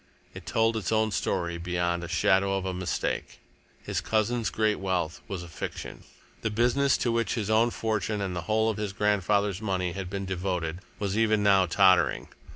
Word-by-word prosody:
It -, -, -11 dB
told 115 Hz, 0 st, +2 dB
its 110 Hz, -1 st, -2 dB
own 110 Hz, 0 st, +2 dB
story 85 Hz, -2 st, -1 dB
beyond 85 Hz, 0 st, -1 dB
any 85 Hz, -, -6 dB
shadow 95 Hz, +2 st, +3 dB
of 95 Hz, -, -4 dB
a 95 Hz, -, -2 dB
mistake. 90 Hz, -1 st, -3 dB, 0.5 s
His -, -, -2 dB
cousin's 115 Hz, +1 st, 0 dB
great 110 Hz, -1 st, 0 dB
wealth 90 Hz, -4 st, -2 dB
was 95 Hz, -5 st, -5 dB
a -, -, -9 dB
fiction. 85 Hz, -, -7 dB, 0.4 s
The 110 Hz, -, 0 dB
business 125 Hz, +5 st, +2 dB
to 120 Hz, -, 0 dB
which 115 Hz, -2 st, 0 dB
his 110 Hz, -3 st, -2 dB
own 115 Hz, +2 st, +4 dB
fortune 110 Hz, -2 st, -2 dB
and 95 Hz, -2 st, -3 dB
the 90 Hz, -, -2 dB
whole 110 Hz, +1 st, +3 dB
of 110 Hz, -, -6 dB
his 105 Hz, -2 st, -3 dB
grandfather's 100 Hz, -1 st, +1 dB
money 95 Hz, -4 st, -1 dB
had 95 Hz, 0 st, -5 dB
been 100 Hz, 0 st, -4 dB
devoted, 90 Hz, -3 st, -2 dB, 0.2 s
was 100 Hz, -2 st, -2 dB
even 110 Hz, -2 st, +3 dB
now 95 Hz, -2 st, +5 dB
tottering. 95 Hz, +1 st, +3 dB
100 Hz, 185 wpm, -27 LUFS, 90-110 Hz, 0.5 s, now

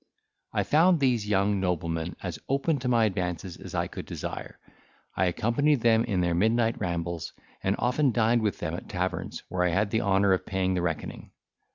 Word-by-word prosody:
I -, -, 0 dB
found 165 Hz, +3 st, +4 dB
these 120 Hz, -6 st, +1 dB
young 100 Hz, 0 st, +2 dB
noblemen 85 Hz, -2 st, -2 dB
as 90 Hz, -5 st, -4 dB
open 140 Hz, +2 st, +1 dB
to 125 Hz, -, -3 dB
my 120 Hz, -2 st, +4 dB
advances 90 Hz, -2 st, -2 dB
as -, -, -9 dB
I -, -, +1 dB
could -, -, -8 dB
desire; -, -, -6 dB, 0.6 s
I 95 Hz, -, +2 dB
accompanied 120 Hz, -, +1 dB
them 115 Hz, 0 st, +4 dB
in 95 Hz, -6 st, 0 dB
their 85 Hz, -1 st, +1 dB
midnight 115 Hz, +5 st, +2 dB
rambles, 85 Hz, -2 st, -3 dB, 0.3 s
and 95 Hz, +1 st, +1 dB
often 125 Hz, +4 st, +2 dB
dined 115 Hz, 0 st, +2 dB
with 105 Hz, -3 st, 0 dB
them -, -, -4 dB
at -, -, -7 dB
taverns, -, -, -3 dB
where 90 Hz, -1 st, -1 dB
I 90 Hz, -, +3 dB
had 100 Hz, +4 st, +1 dB
the 110 Hz, -, +1 dB
honour 100 Hz, -1 st, +3 dB
of 95 Hz, -, 0 dB
paying 95 Hz, -1 st, -1 dB
the 90 Hz, -, 0 dB
reckoning. 80 Hz, -3 st, -4 dB
100 Hz, 190 wpm, -27 LUFS, 90-120 Hz, 0.6 s, found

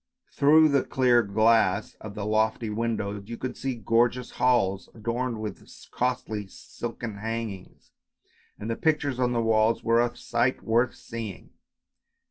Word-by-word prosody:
Through 155 Hz, +2 st, +5 dB
the 140 Hz, -2 st, +2 dB
clear 125 Hz, -2 st, +3 dB
glass 110 Hz, -1 st, +2 dB
of 105 Hz, -1 st, -8 dB
the 105 Hz, -2 st, -4 dB
lofty 110 Hz, +1 st, 0 dB
windows 105 Hz, -2 st, -3 dB
you 115 Hz, -, -5 dB
could 130 Hz, -1 st, -4 dB
see 135 Hz, -2 st, -3 dB
gorgeous 120 Hz, +3 st, +1 dB
halls 100 Hz, -7 st, +1 dB
adorned 115 Hz, +1 st, -2 dB
with 105 Hz, -3 st, -6 dB, 0.3 s
costly 120 Hz, -5 st, -2 dB
silken 115 Hz, +1 st, -7 dB
hangings, 110 Hz, -3 st, -6 dB, 0.7 s
and 105 Hz, -, -7 dB
the 115 Hz, -, -1 dB
pictures 145 Hz, -4 st, 0 dB
on 125 Hz, -1 st, +2 dB
the 120 Hz, -1 st, 0 dB
walls 110 Hz, 0 st, +2 dB
were 115 Hz, +1 st, +4 dB
a 120 Hz, 0 st, -1 dB
sight 120 Hz, +2 st, 0 dB
worth 120 Hz, +3 st, +1 dB
seeing. 115 Hz, -5 st, -8 dB
115 Hz, 140 wpm, -26 LUFS, 110-125 Hz, 0.7 s, Through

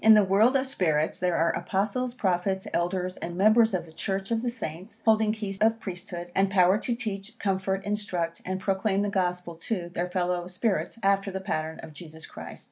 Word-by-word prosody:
In 220 Hz, 0 st, +9 dB
the 210 Hz, -, +6 dB
world 205 Hz, +7 st, +4 dB
of 265 Hz, 0 st, +3 dB
spirits 160 Hz, -, 0 dB
there 180 Hz, -1 st, +1 dB
are 165 Hz, +1 st, +3 dB
Apostles, 215 Hz, +7 st, -1 dB
Prophets, 190 Hz, -3 st, 0 dB
Elders, 180 Hz, +1 st, -1 dB
and 170 Hz, 0 st, -5 dB
members 215 Hz, +2 st, +5 dB
of 175 Hz, -, -2 dB
the 160 Hz, -, -15 dB
Church 195 Hz, +4 st, -3 dB
of 225 Hz, -1 st, +1 dB
the 245 Hz, -, -1 dB
Saints, 210 Hz, -1 st, -7 dB
holding 220 Hz, -1 st, +4 dB
keys 205 Hz, -3 st, -4 dB
of 225 Hz, +1 st, +3 dB
Priesthood, 175 Hz, -3 st, -6 dB
and 195 Hz, 0 st, +3 dB
power 190 Hz, +1 st, +4 dB
to 240 Hz, 0 st, -1 dB
teach, 215 Hz, -2 st, -5 dB
comfort, 190 Hz, -1 st, -1 dB
instruct, 185 Hz, -5 st, -2 dB
and 185 Hz, 0 st, -3 dB
proclaim 195 Hz, +1 st, +1 dB
the 205 Hz, -, 0 dB
Gospel 180 Hz, -2 st, -1 dB
to, 175 Hz, +1 st, -3 dB
their 180 Hz, +1 st, -2 dB
fellow 180 Hz, -1 st, -1 dB
spirits, 195 Hz, +4 st, -1 dB
after 195 Hz, 0 st, +2 dB
the 190 Hz, 0 st, -4 dB
pattern 160 Hz, -4 st, -3 dB
of 160 Hz, -1 st, -10 dB
Jesus 160 Hz, 0 st, -10 dB
Christ. -, -, -9 dB
190 Hz, 200 wpm, -27 LUFS, 175-215 Hz, -, In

